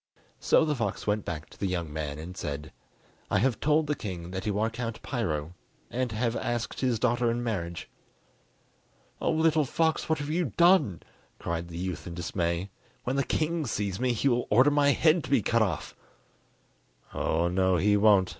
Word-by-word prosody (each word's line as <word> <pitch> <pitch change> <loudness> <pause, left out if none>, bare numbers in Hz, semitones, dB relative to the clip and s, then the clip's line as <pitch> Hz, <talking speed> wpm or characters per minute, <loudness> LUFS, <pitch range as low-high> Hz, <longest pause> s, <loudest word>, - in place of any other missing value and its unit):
So 160 - +4
the 150 - +1
fox 125 -5 -3
went 105 0 0
back 75 -3 -5
to - - -16
the 100 - 0
young 85 -5 -3
man 75 -2 -4
and 85 +4 -8
said: 75 -2 -5 0.6
"I - - +2
have 120 +3 +1
told 155 +1 +3
the 150 - 0
king 90 - -6
that 95 +2 -4
you 105 -1 0
are 110 +2 +1
Count 115 -1 -4
Piro, 85 - -2 0.4
and 125 -1 -1
have 115 +2 -1
asked 120 0 -2
his 125 -3 +1
daughter 120 +1 +1
in 120 +1 -1
marriage." 85 -7 -3 1.3
"Oh, - - +1
little 160 -1 +3
fox, 160 +5 0
what 160 - +2
have 145 +1 -4
you 165 -4 -1
done?" 170 - +4 0.3
cried 85 0 -3
the 85 -1 -8
youth 90 0 -4
in 85 - -6
dismay; 85 +1 -2 0.3
"when 125 - -1
the 140 - +2
king 160 0 -1
sees 100 -3 -2
me 125 0 +1
he 120 +4 0
will 120 -2 +1
order 130 +7 +5
my 145 -1 +4
head 155 +2 +3
to - - -8
be 135 -6 +3
cut 115 +3 +2
off." 85 -10 -1 1.2
"Oh, 85 +2 +1
no, 95 +1 +2
he 105 +5 +3
won't!" 100 -3 +5
110 Hz, 190 wpm, -28 LUFS, 90-135 Hz, 1.3 s, order